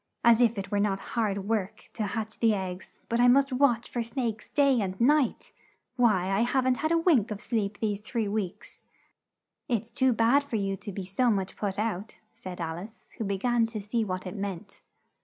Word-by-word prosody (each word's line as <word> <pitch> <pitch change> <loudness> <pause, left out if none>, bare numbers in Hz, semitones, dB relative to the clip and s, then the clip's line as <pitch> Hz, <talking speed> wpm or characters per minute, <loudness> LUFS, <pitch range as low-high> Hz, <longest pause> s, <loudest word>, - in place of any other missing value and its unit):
As 235 0 +6
if 235 -2 +3
it 195 +1 -5
were 205 - +1
not 200 -1 +1
hard 200 -4 -1
work 215 -1 -3
to 215 -2 -2
hatch 220 +1 -4
the 225 -2 +3
eggs, 185 -1 -6
but 235 - 0
I 245 - +6
must 270 +2 +4
watch 250 -3 +2
for 240 - -3
snakes 230 -2 -3
night 275 -4 +4
and 190 -1 -3
day! 280 +2 +3 0.6
Why 210 -7 +2
I 195 - +2
haven't 255 +2 +2
had 315 +1 -1
a 335 - +4
wink 315 - +3
of 210 -2 -4
sleep 210 -4 -2
these 210 -2 -1
three 220 0 -2
weeks!" 200 -3 -5 0.8
"It's 230 -1 -1
too 260 0 +2
bad 240 +5 +3
for 280 -5 -5
you 195 -2 0
to 205 - -8
be 190 0 -5
so 220 +7 +1
much 195 -4 -1
put 200 -2 -3
out," 215 -1 -3 0.2
said 185 -1 -8
Al 165 0 -3
ice, 215 +5 -12
who - - -1
be 200 -1 -1
gan 240 +2 +2
to 220 -1 -5
see 215 +3 -1
what 185 -3 -4
it 185 - -6
meant. 200 -1 -6
220 Hz, 210 wpm, -28 LUFS, 195-240 Hz, 0.8 s, As